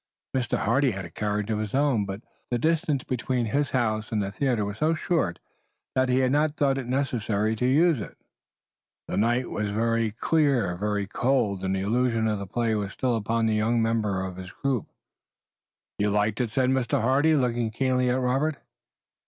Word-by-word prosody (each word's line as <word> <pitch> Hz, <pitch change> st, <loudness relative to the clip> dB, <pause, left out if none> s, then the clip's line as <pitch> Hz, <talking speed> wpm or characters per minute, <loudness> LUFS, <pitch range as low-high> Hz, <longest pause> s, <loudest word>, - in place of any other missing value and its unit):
Mr. 125 Hz, -2 st, 0 dB
Hardy 130 Hz, +5 st, +2 dB
had 95 Hz, -2 st, -5 dB
a 85 Hz, -, -11 dB
carriage 105 Hz, +2 st, -2 dB
of 105 Hz, -, 0 dB
his 110 Hz, +2 st, -3 dB
own, 135 Hz, -7 st, +2 dB
but 100 Hz, +2 st, -6 dB, 0.3 s
the 120 Hz, -, 0 dB
distance 155 Hz, -1 st, +1 dB
between 125 Hz, -1 st, -1 dB
his 140 Hz, +6 st, 0 dB
house 110 Hz, -3 st, -1 dB
and 110 Hz, -, 0 dB
the 100 Hz, -1 st, -2 dB
theater 120 Hz, -3 st, 0 dB
was 100 Hz, +1 st, -6 dB
so 160 Hz, +2 st, +2 dB
short 160 Hz, -, 0 dB, 0.6 s
that 130 Hz, 0 st, +2 dB
he 125 Hz, -, +3 dB
had 130 Hz, -1 st, +2 dB
not 150 Hz, +1 st, +1 dB
thought 135 Hz, -2 st, +2 dB
it 130 Hz, -, -6 dB
necessary 115 Hz, -5 st, 0 dB
to 125 Hz, +3 st, 0 dB
use 155 Hz, 0 st, +3 dB
it. -, -, -9 dB, 0.9 s
The -, -, -3 dB
night 120 Hz, +4 st, +1 dB
was 105 Hz, -1 st, -2 dB, 0.5 s
clear, 140 Hz, -, +2 dB
very 105 Hz, +2 st, -1 dB
cold 110 Hz, -3 st, 0 dB
and 95 Hz, 0 st, 0 dB
the 95 Hz, -, -1 dB
illusion 115 Hz, +2 st, +1 dB
of 105 Hz, -2 st, 0 dB
the 100 Hz, -, -6 dB
play 115 Hz, +3 st, 0 dB
was 100 Hz, -2 st, -2 dB
still 125 Hz, -2 st, 0 dB
upon 115 Hz, +1 st, 0 dB
the 110 Hz, -, +2 dB
younger 110 Hz, +2 st, +1 dB
members 105 Hz, -4 st, 0 dB
of 95 Hz, -1 st, -7 dB
his 95 Hz, -1 st, -7 dB
group. 130 Hz, +2 st, -2 dB, 1.1 s
"You 105 Hz, +1 st, +2 dB
liked 105 Hz, +3 st, +1 dB
it?" 120 Hz, -, -1 dB
said 130 Hz, +3 st, +1 dB
Mr. 130 Hz, -3 st, +1 dB
Hardy, 140 Hz, +7 st, +3 dB
looking 120 Hz, -4 st, +1 dB
keenly 125 Hz, +2 st, +1 dB
at 125 Hz, +1 st, +1 dB
Robert. 135 Hz, +4 st, 0 dB
120 Hz, 190 wpm, -26 LUFS, 105-130 Hz, 1.1 s, he